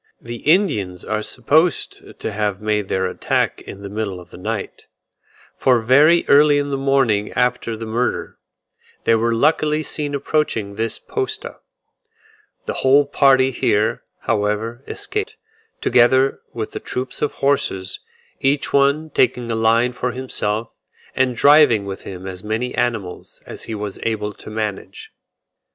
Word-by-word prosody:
The 120 0 -7
Indians 105 - +1
are 110 0 -1
supposed 150 +10 0
to - - -3
have 105 -2 -2
made 105 -2 -1
their 95 0 0
attack 90 - -1
in 100 - -10
the - - -5
middle 100 -3 -4
of 90 - -15
the - - -11
night; - - -5 0.7
for 125 -2 +3
very 145 +9 +5
early 145 +1 +6
in 145 0 -1
the - - 0
morning 135 -7 +1
after 125 -2 0
the 115 - -6
murder, 115 +3 -2 0.6
they - - +3
were 115 +1 +2
luckily 150 +3 +2
seen 145 -2 -3
approaching 140 -8 -1
this 110 +2 -2
posta. 425 +1 -4 1.1
The - - -2
whole 140 +2 +5
party 135 -2 +4
here, 110 -3 +1 0.2
however, 105 +4 -1
escaped, 420 +1 -4 0.5
together 130 +2 +3
with 110 -2 -5
the - - -5
troop 130 +1 -5
of 150 - 0
horses; 95 -9 -1 0.4
each 140 +1 0
one 140 +3 +2
taking 125 -3 +1
a - - 0
line 115 +2 +3
for 125 0 -3
himself, 115 -4 -2 0.4
and 130 -1 +1
driving 140 -6 +5
with 95 -1 -6
him 95 -1 -8
as 95 0 -6
many 110 +4 -2
animals 115 -7 -3
as - - -8
he 110 - -5
was 105 -2 -5
able 105 -2 -2
to - - -12
manage. 105 -3 -5
120 Hz, 145 wpm, -20 LUFS, 105-140 Hz, 1.1 s, early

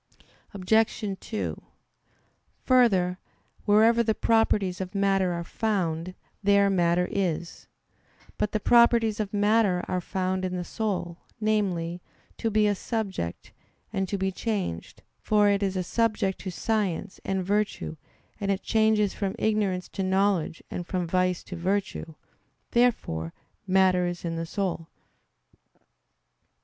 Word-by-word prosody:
Obj. 210 +1 +1
2: 215 - -4 1.0
Further, 195 -8 +3 0.5
wherever 225 +3 +5
the 220 -2 +1
properties 205 -5 +2
of 185 +2 -6
matter 195 -2 +2
are 170 0 -3
found, 180 -4 -2 0.3
there 200 0 +4
matter 175 -1 +2
is. 175 -4 -2 0.7
But 210 - 0
the 215 - 0
properties 235 -1 +4
of 205 -2 -2
matter 205 -3 +2
are 180 - -1
found 185 0 -2
in 185 0 -2
the 180 - -2
soul 180 -4 -3 0.2
namely, 185 -6 0 0.4
to 225 - 0
be 215 0 +3
a 205 - +3
subject, 195 - -4 0.4
and 190 -1 -1
to 200 - -1
be 190 0 0
changed, 190 - -4 0.2
for 210 -1 +3
it 200 0 +2
is 195 -1 0
a 185 - 0
subject 210 -1 0
to 190 - -5
science, 195 -2 -2
and 190 -1 -1
virtue; 205 -4 -1 0.4
and 200 -2 -2
it 195 -1 0
changes 220 -2 +2
from 195 0 -3
ignorance 205 -5 0
to 195 - -5
knowledge 190 -3 +1
and 175 -1 -5
from 180 -2 -1
vice 180 +1 0
to 185 - -8
virtue. 185 -2 -2 0.6
Therefore 215 - +1 0.3
matter 185 -1 +3
is 175 0 -5
in 165 -1 -2
the 165 0 -3
soul. 180 -4 -3
195 Hz, 135 wpm, -27 LUFS, 180-215 Hz, 1.0 s, wherever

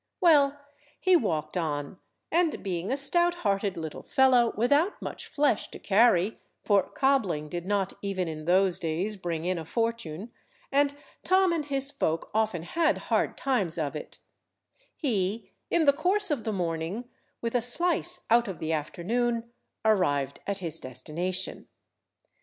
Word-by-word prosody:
Well, 290 -6 +5 0.4
he 370 -1 +4
walked 160 - 0
on, 155 -1 -3 0.3
and 335 -1 +1
being 185 +1 -2
a 270 - +1
stout–hearted 275 - 0
little 160 -2 -5
fellow 255 -4 +4
without 285 - +2
much - - -6
flesh 290 -7 +1
to - - -9
carry, 205 -1 +3 0.2
for 205 -2 +4
cobbling 190 - 0
did 175 +2 -5
not 200 -2 0
even 195 -3 -2
in 155 -1 -6
those 185 +1 +3
days 170 +6 -2
bring 170 -4 -4
in 180 -1 0
a - - -5
fortune, 225 -1 -3 0.4
and 285 0 +2 0.3
Tom 375 -1 +4
and 315 -3 -1
his 275 -1 -2
folk 165 - -2
often 215 -6 0
had 325 - +1 0.2
hard - - +1
times 205 -12 0
of 155 -2 -2
it; 150 - -7 0.8
he, 215 - -1 0.2
in 335 -2 +2
the 280 - +6
course 370 +5 +1
of 255 -7 -1
the 220 - 0
morning, 175 +4 -3 0.3
with 230 -1 -3
a 245 - +2
slice 345 +8 +1
out 235 0 +5
of 190 -4 -5
the 160 +1 -2
afternoon, 230 +9 -1 0.3
arrived 145 -10 +2
at 200 -1 -1
his 170 -5 -3
destination. 175 +8 -3
210 Hz, 150 wpm, -28 LUFS, 170-275 Hz, 0.8 s, the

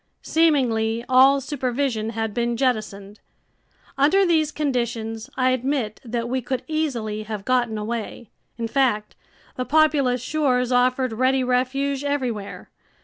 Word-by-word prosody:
Seemingly, 240 -8 +1
all 265 +2 +6
supervision 255 -4 -2
had 225 -2 -3
been 235 0 -1
jettisoned. 215 -5 -2 0.8
Under 380 +8 +4
these 315 -3 +2
conditions 235 -6 -3
I 255 0 +3
admit 255 -4 -2
that 235 -1 -3
we 260 +1 -1
could 255 +1 -3
easily 250 -10 -2
have 215 -2 -6
gotten 245 -3 +1
away. 220 +1 -5 0.3
In 230 -1 -2
fact, 225 -4 0 0.4
the 255 - -1
populous 285 -5 +3
shores 255 -2 0
offered 255 0 +2
ready 260 +3 +2
refuge 260 +2 0
everywhere. 255 -8 -3
250 Hz, 125 wpm, -23 LUFS, 225-275 Hz, 0.8 s, all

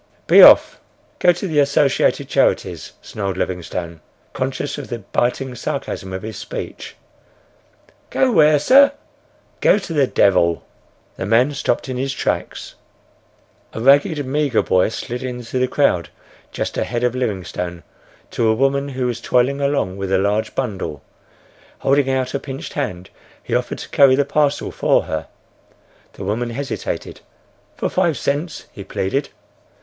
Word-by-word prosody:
"Be - - +7
off. - - +7 0.4
Go 175 - +5
to 175 +3 -4
the 155 -4 +1
Associated 140 -1 +2
Charities," - - 0
snarled 100 -3 -4
Livingstone, 85 -3 -4 0.3
conscious 130 +3 -3
of 140 - -7
the 120 - -4
biting 125 +4 -2
sarcasm 125 -7 -5
of 95 0 -5
his 110 0 -6
speech. - - -7 1.1
"Go 260 -1 +2
where, 155 -6 +5
sir?" 275 - +6 0.7
"Go - - +4
to 185 -5 -5
the 140 -4 +3
devil!" 85 -7 +2 0.5
The 95 - -4
man 120 +6 +3
stopped 140 - -1
in 130 -1 -4
his 135 +1 -2
tracks. - - -3 1.0
A - - -5
ragged, 145 - +3
meagre 140 -2 +1
boy 90 +2 +2
slid 120 +2 -5
in 125 -1 -5
through 125 +2 -3
the 130 - +2
crowd 90 - +1 0.4
just - - -3
ahead 120 +1 -2
of 125 -1 +1
Livingstone, 90 -7 -4 0.5
to 115 - 0
a 110 - +3
woman 140 +3 +1
who 130 -2 -3
was 120 -1 -3
toiling 130 +4 +1
along 140 -10 0
with 95 -1 -4
a 95 - +4
large 100 +3 -1
bundle. 95 - -4 0.7
Holding 135 0 +2
out 130 -1 -1
a 140 - -1
pinched 135 +2 -7
hand, 95 -11 -4 0.3
he - - -6
offered - - -1
to - - -9
carry 135 -2 +5
the 140 +1 +1
parcel 145 0 0
for - - +2
her. 80 - -4 0.9
The - - -9
woman 110 +5 -2
hesitated. 135 +2 -5 0.6
—"For - - -1
five 165 -5 0
cents," 150 +4 -3
he 100 - -9
pleaded. 95 +8 -2
130 Hz, 150 wpm, -19 LUFS, 100-140 Hz, 1.1 s, Be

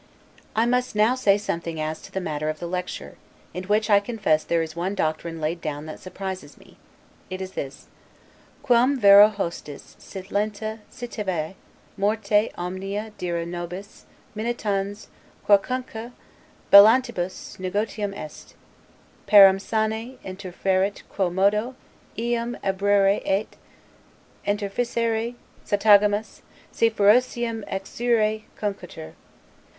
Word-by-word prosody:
I 225 +1 +3
must 250 -1 0
now 215 +3 +4
say 205 -6 +3
something 170 -5 -4
as 155 +1 -3
to - - -13
the 190 - -2
matter 155 -4 -3
of 155 - -3
the 170 - -6
"Lecture," 180 +1 -5 0.4
in 180 +1 -5
which 210 +2 +1
I 205 -2 +6
confess 200 -8 0
there 165 -1 +1
is 160 0 -7
one 180 +4 -2
doctrine 165 -1 -2
laid 160 +2 -2
down 150 -1 -4
that 155 - -8
surprises 190 0 -7
me: - - -19 0.5
It 185 - -5
is 190 0 -6
this, 135 -6 -6 0.8
'Quum 255 +1 +3
vero 200 -1 +9
hostis 170 -8 -6
sit 190 0 -10
lenta 215 +1 -2
citave 195 - -4 0.4
morte 210 +1 +1
omnia 195 +4 -4
dira 170 -2 -2
nobis 175 +3 -7 0.3
minitans 205 -2 -2 0.4
quocunque 235 +3 +1 0.6
bellantibus 215 -2 +5
negotium 205 +2 -2
est; 155 - -10 0.7
parum 195 -2 +8
sane 220 +4 -2
interfuerit 190 +1 -1
quo 190 -3 0
modo 210 +7 +1 0.4
eum 235 +1 -2
obruere 195 0 +2
et 195 +3 -1 0.9
interficere 225 +3 -1 0.3
satagamus, 205 0 +3 0.3
si 230 - +3
ferociam 225 +1 +2
exuere 215 +2 0
cunctetur. 190 - -5
200 Hz, 115 wpm, -24 LUFS, 185-220 Hz, 0.9 s, vero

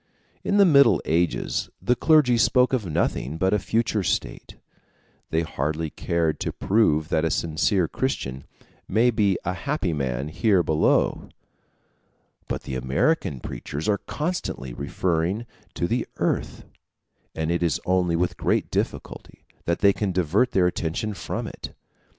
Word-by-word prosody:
In 200 - +1
the 200 - +7
Middle 140 -5 +6
Ages 85 +2 0
the 125 - +1
clergy 150 -4 +4
spoke 125 +3 +3
of 115 -7 0
nothing 75 -2 -1
but 95 +4 +1
a 105 - +3
future 110 +1 0
state; 80 -5 -3 0.7
they 80 +1 +1
hardly 80 +1 -3
cared 85 -2 -1
to - - -2
prove 80 -7 +1
that 80 - +1
a 80 - +2
sincere 80 +3 +1
Christian 70 - -3 0.4
may 115 +5 +3
be 105 -4 +2
a 90 - 0
happy 100 - -2
man 70 -1 -2
here 95 +2 +2
below. 80 -1 +1 1.2
But - - -4
the - - -6
American 65 - 0
preachers 70 +6 -5
are 105 -1 +2
constantly 150 - -4
referring 85 - -1 0.3
to - - -1
the 120 +5 -1
earth; - - -2 0.7
and 80 +1 -1
it 85 - 0
is 85 -3 +1
only 90 -2 +2
with 90 +1 -1
great - - 0
difficulty - - -4 0.2
that 85 - -1
they 100 -1 +5
can 100 -1 -2
divert 90 +7 +2
their 95 -2 +3
attention 90 +4 -2
from - - -4
it. - - -8
90 Hz, 145 wpm, -24 LUFS, 80-110 Hz, 1.2 s, the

